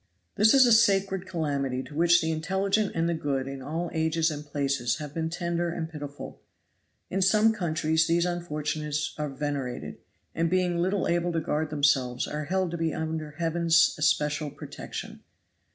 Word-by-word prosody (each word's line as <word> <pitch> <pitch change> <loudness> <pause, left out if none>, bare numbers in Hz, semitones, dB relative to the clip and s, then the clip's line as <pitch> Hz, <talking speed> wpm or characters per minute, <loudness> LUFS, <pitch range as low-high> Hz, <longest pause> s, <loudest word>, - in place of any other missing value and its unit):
"This 220 +5 +5
is 265 -1 +8
a 240 - +4
sacred 195 -4 +3
calamity 140 -7 -2
to 150 - -12
which 170 +2 +4
the 160 0 0
intelligent 190 +6 0
and 165 0 +1
the 170 - +1
good 140 -4 -2
in 135 0 -6
all 165 +5 -3
ages 160 0 +1
and 150 -1 -5
places 140 -5 -1
have 150 -2 -7
been 160 0 -2
tender 170 0 -2
and 165 -1 -3
pitiful. 145 -3 -8 0.7
In 195 - 0
some 215 +4 +4
countries 160 -4 +1
these 170 +1 +2
unfortunates 150 -3 -2
are 150 -1 -2
venerated, 135 - -4 0.3
and 165 0 0
being 180 -1 +1
little 190 +3 0
able 175 0 +1
to 165 - +1
guard 155 0 -1
themselves 135 -4 +1
are 150 0 -4
held 185 +1 0
to 170 - -4
be 165 -1 -1
under 155 -2 -4
Heaven's 170 0 +3
especial 150 0 +1
protection. - - -8
160 Hz, 170 wpm, -27 LUFS, 150-175 Hz, 0.7 s, is